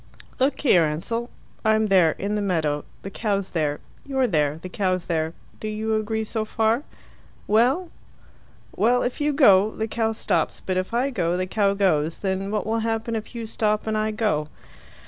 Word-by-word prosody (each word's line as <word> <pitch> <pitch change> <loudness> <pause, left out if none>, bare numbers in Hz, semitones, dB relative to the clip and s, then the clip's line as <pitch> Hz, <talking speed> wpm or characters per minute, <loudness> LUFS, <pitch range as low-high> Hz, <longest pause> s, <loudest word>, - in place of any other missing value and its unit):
"Look 265 +3 +1
here, 185 - +5
Ansell. 230 +11 -3 0.3
I'm 220 0 +3
there 185 -6 +4
in 200 +1 -3
the 210 - 0
meadow 155 -7 0 0.2
the 195 - -6
cow's 200 -2 -2
there. 150 -3 -1 0.2
You're 265 -2 0
there 150 -8 +1
the 185 - -7
cow's 185 -1 -1
there. 160 -1 -1 0.3
Do 215 - -5
you 220 +1 -1
agree 220 +1 -1
so 220 0 -2
far?" 220 +3 +1 0.6
"Well?" 255 - +2 0.8
"Well, 245 +3 +3
if 250 +4 -3
you 295 +1 +2
go, 210 -9 +6
the 220 0 -3
cow 225 0 0
stops; - - -1
but 185 - -3
if 185 +3 -1
I 250 +4 +1
go, 175 -7 0
the 185 - 0
cow 200 +1 +1
goes. 165 -5 +1
Then 195 0 -2
what 210 0 -1
will 225 +1 0
happen 225 +1 -1
if 220 +2 -6
you 230 -1 -4
stop 215 -1 0
and 220 -1 -1
I 215 0 +1
go?" 210 -9 0
215 Hz, 185 wpm, -24 LUFS, 185-225 Hz, 0.8 s, go